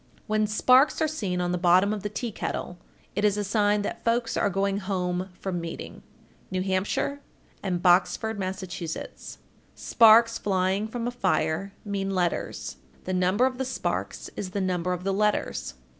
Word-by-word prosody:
When 215 Hz, 0 st, +1 dB
sparks 255 Hz, +6 st, +4 dB
are 315 Hz, -, +2 dB
seen 205 Hz, -13 st, -2 dB
on 175 Hz, 0 st, 0 dB
the 180 Hz, -, -1 dB
bottom 185 Hz, +4 st, +4 dB
of 210 Hz, -, -4 dB
the 205 Hz, -, -3 dB
tea 225 Hz, +3 st, -4 dB
kettle, 180 Hz, -3 st, -4 dB, 0.4 s
it 205 Hz, -, -1 dB
is 210 Hz, -1 st, +3 dB
a 205 Hz, -, 0 dB
sign 205 Hz, 0 st, +2 dB
that -, -, -5 dB
folks 230 Hz, 0 st, +1 dB
are -, -, +2 dB
going 195 Hz, +1 st, 0 dB
home 185 Hz, -2 st, -2 dB
from 180 Hz, -3 st, -3 dB
meeting. 165 Hz, 0 st, -7 dB, 0.5 s
New 185 Hz, -1 st, -1 dB
Hampshire 190 Hz, +9 st, -1 dB, 0.4 s
and 180 Hz, -2 st, -2 dB
Boxford, 195 Hz, +4 st, +3 dB
Mass. 190 Hz, 0 st, -3 dB
1460. 170 Hz, -3 st, -7 dB, 0.4 s
Sparks 230 Hz, 0 st, +5 dB
flying 190 Hz, +1 st, 0 dB
from 230 Hz, +1 st, -4 dB
a 245 Hz, -, -1 dB
fire 195 Hz, -4 st, 0 dB
mean 195 Hz, -1 st, -2 dB
letters; 70 Hz, -, -2 dB, 0.3 s
the 185 Hz, -, -3 dB
number 185 Hz, +6 st, +3 dB
of 260 Hz, -1 st, -2 dB
the -, -, +1 dB
sparks 260 Hz, -, -3 dB
is 190 Hz, -, -4 dB
the 200 Hz, -, -3 dB
number 180 Hz, -2 st, -1 dB
of 180 Hz, 0 st, -3 dB
the 195 Hz, 0 st, 0 dB
letters. 190 Hz, -, 0 dB
195 Hz, 175 wpm, -26 LUFS, 180-215 Hz, 0.5 s, Sparks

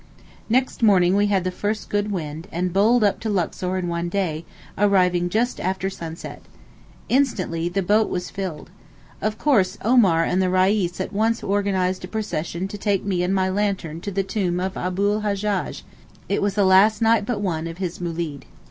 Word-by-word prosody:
Next 255 Hz, +3 st, +1 dB
morning 190 Hz, -4 st, +4 dB
we 205 Hz, +1 st, +3 dB
had 195 Hz, -3 st, +1 dB
the 185 Hz, -, -1 dB
first 210 Hz, +3 st, -3 dB
good 205 Hz, 0 st, -1 dB
wind, 160 Hz, -2 st, -5 dB
and 180 Hz, +1 st, -2 dB
bowled 220 Hz, +4 st, +4 dB
up 205 Hz, -, +2 dB
to 225 Hz, -, -3 dB
Luxor 185 Hz, -1 st, -1 dB
in 180 Hz, -1 st, -2 dB
one 170 Hz, 0 st, -2 dB
day, 170 Hz, -4 st, -2 dB, 0.3 s
arriving 180 Hz, -3 st, +2 dB
just 235 Hz, +6 st, 0 dB
after 190 Hz, +1 st, -2 dB
sunset. 165 Hz, -3 st, -8 dB, 0.7 s
Instantly 185 Hz, -11 st, 0 dB
the 195 Hz, +2 st, -1 dB
boat 210 Hz, +4 st, +3 dB
was 180 Hz, -1 st, -4 dB
filled. 180 Hz, -4 st, -6 dB, 0.5 s
Of 215 Hz, +1 st, -1 dB
course 210 Hz, -11 st, +2 dB
Omar 200 Hz, -8 st, +4 dB
and 180 Hz, +2 st, +1 dB
the 185 Hz, -, +1 dB
Reis 185 Hz, -1 st, +2 dB
at 190 Hz, -, -4 dB
once 225 Hz, +3 st, +1 dB
organized 190 Hz, -2 st, 0 dB
a -, -, -5 dB
procession 185 Hz, -4 st, -3 dB
to 205 Hz, -, -7 dB
take 200 Hz, -2 st, 0 dB
me 185 Hz, -3 st, 0 dB
and 180 Hz, +1 st, 0 dB
my 190 Hz, -1 st, +2 dB
lantern 190 Hz, -5 st, -2 dB
to 205 Hz, -, -4 dB
the 195 Hz, +1 st, 0 dB
tomb 185 Hz, -3 st, -1 dB
of 190 Hz, +1 st, -3 dB
Abu 185 Hz, +2 st, -1 dB
l 210 Hz, +1 st, -1 dB
Hajjaj—it 205 Hz, -1 st, -3 dB
was 200 Hz, -1 st, 0 dB
the 205 Hz, -2 st, +3 dB
last 205 Hz, +4 st, +5 dB
night 225 Hz, -2 st, +3 dB
but 240 Hz, -4 st, -1 dB
one 165 Hz, -5 st, -2 dB
of 165 Hz, 0 st, -7 dB
his 180 Hz, -2 st, -4 dB
moolid. 165 Hz, -4 st, -4 dB
190 Hz, 185 wpm, -23 LUFS, 180-205 Hz, 0.7 s, last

